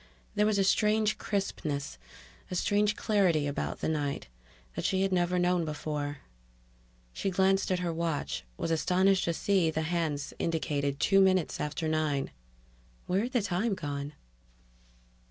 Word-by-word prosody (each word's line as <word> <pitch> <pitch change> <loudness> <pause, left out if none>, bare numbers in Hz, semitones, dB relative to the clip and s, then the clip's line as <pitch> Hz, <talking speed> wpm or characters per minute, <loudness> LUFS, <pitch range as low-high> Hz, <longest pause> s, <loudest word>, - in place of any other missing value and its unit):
There 210 0 +3
was 215 -1 +2
a 195 - +3
strange 210 +2 +2
crispness, 150 - -3 0.5
a 180 - -4
strange 205 +3 +2
clarity 185 -9 +2
about 145 0 -3
the - - 0
night, 145 -3 -2 0.5
that - - -3
she 190 0 +1
had 195 - 0
never 180 0 +2
known 180 -1 +2
before... 150 -2 -4 0.9
She 195 - -2
glanced 190 +1 +2
at 185 - +2
her 170 -2 -1
watch, 160 - -2
was 165 - -2
astonished 185 +4 +3
to 170 - +1
see 190 -4 +2
that 160 - -5
the - - 0
hands 160 -5 -1
indicated 145 -4 -1
two 195 -1 +4
minutes 185 -3 +2
after 150 +2 -2
nine. 155 -3 0 0.7
Where 185 +2 +1
had 245 +4 -3
the 245 -5 +2
time 200 +3 0
gone? 145 -3 -4
175 Hz, 155 wpm, -30 LUFS, 150-195 Hz, 0.9 s, two